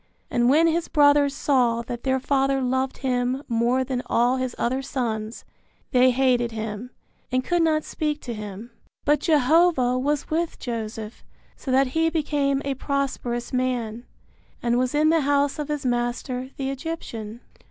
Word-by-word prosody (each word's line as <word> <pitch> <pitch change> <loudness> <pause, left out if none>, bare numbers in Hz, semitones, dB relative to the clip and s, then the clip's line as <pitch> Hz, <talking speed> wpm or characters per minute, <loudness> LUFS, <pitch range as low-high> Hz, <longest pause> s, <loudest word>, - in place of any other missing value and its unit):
And 240 0 +3
when 310 +5 +5
his 330 +1 +1
brothers 285 -1 +4
saw 245 -5 +2
that 240 0 -6
their 265 -1 +1
father 270 0 +1
loved 260 +1 -1
him 250 +1 0
more 240 +2 +1
than 255 -1 -2
all 245 +2 +2
his 255 -1 -3
other 260 +3 0
sons, 230 -4 -3 0.5
they 255 0 +5
hated 250 -2 +2
him, 220 +1 -5 0.4
and 255 0 +1
could 350 +3 +1
not 310 -2 +2
speak 300 -1 -2
to 240 - -5
him. 210 +2 -8 0.3
But 295 +1 +3
Jehovah 300 -4 +3
was 290 +3 -1
with 330 +1 -1
Joseph 225 -2 -6 0.3
so - - -9
that 260 0 +3
he 325 0 +2
became 290 -3 0
a 280 - 0
prosperous 265 -3 -3
man, 245 -2 -2 0.5
and 240 0 +1
was 255 +2 0
in 305 +1 +4
the 325 0 +3
house 285 +1 +1
of 295 - -3
his 295 -2 -3
master 245 +1 -2
the 270 -1 -2
Egyptian. 245 -7 -6
260 Hz, 160 wpm, -24 LUFS, 240-285 Hz, 0.5 s, when